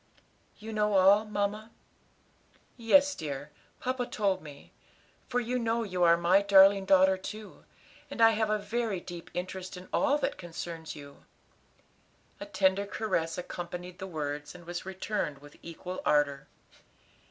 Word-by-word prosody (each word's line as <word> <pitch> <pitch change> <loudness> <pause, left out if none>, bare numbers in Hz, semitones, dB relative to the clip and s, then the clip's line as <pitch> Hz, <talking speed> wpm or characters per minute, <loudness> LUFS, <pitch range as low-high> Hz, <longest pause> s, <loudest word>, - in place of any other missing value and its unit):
"You 220 +1 -8
know 210 -1 +1
all, 195 +3 +6
mamma?" 210 +1 -2 1.1
"Yes, 280 +5 +4
dear; 145 - -6 0.3
papa 255 -1 -2
told 200 -6 0
me; 145 -2 -13 0.6
for 245 -1 +1
you 245 +1 -1
know 230 0 0
you 185 -4 -4
are 170 0 +6
my 175 +3 +4
darling 195 0 +6
daughter 190 0 +5
too, 210 +2 -9 0.4
and - - -8
I 225 0 +7
have 220 -1 0
a 215 - +2
very 210 -1 -2
deep 175 -1 -9
interest 185 +1 -5
in 180 +1 -11
all 290 0 +3
that 290 - -2
concerns 165 -2 -7
you." 140 -1 -13 1.1
A 200 - -7
tender 200 0 +1
caress 175 -7 -2
accompanied 180 0 -7
the 190 - -5
words, 150 -2 -5
and 175 -1 -12
was 175 +2 -6
returned 190 -5 -3
with 145 +1 -16
equal 175 +2 -7
ardor. 145 -2 +1
190 Hz, 145 wpm, -29 LUFS, 170-215 Hz, 1.1 s, I